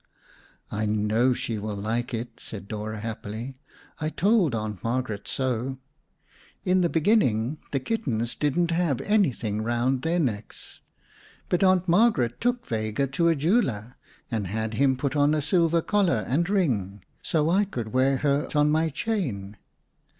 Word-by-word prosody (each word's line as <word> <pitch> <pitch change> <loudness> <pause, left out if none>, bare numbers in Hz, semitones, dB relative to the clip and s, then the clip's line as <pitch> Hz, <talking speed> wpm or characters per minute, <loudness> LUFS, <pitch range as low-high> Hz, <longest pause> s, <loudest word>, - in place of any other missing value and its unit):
"I 105 0 -1
know 110 +4 +2
she 115 -2 -3
will 105 0 -4
like 110 +5 -2
it," 120 0 -5
said 100 -3 -8
Dora 110 0 -5
happily. 115 +3 -6 0.4
"I 155 - -1
told 190 - +2
Aunt 105 -4 -4
Margaret 115 -3 -2
so. 130 0 -1 0.9
In 185 0 +3
the 170 - +2
beginning 150 - +2
the 135 - 0
kittens 125 - -2
didn't 170 +4 0
have 165 -6 +1
anything 130 - +1
around 120 +3 0
their 165 +4 0
necks, 115 -9 -4 0.7
but 180 - +2
Aunt 185 -1 +4
Margaret 170 - +3
took 245 0 0
Vega 110 +3 -1
to 145 +6 0
a 165 - +4
jeweler, 135 - 0 0.4
and 110 -4 -1
had 110 +3 -3
him 130 +2 +2
put 140 +2 -2
on 145 +1 +3
a - - +1
silver 165 +1 +2
collar 185 - +1
and 170 +8 +1
ring, 105 - 0 0.2
so 160 0 +1
I 200 +3 +3
could 120 - -5
wear 130 +1 +3
her 145 +1 +1
on 150 0 +4
my 160 +1 +2
chain. 140 - -3
130 Hz, 150 wpm, -26 LUFS, 110-170 Hz, 0.9 s, Aunt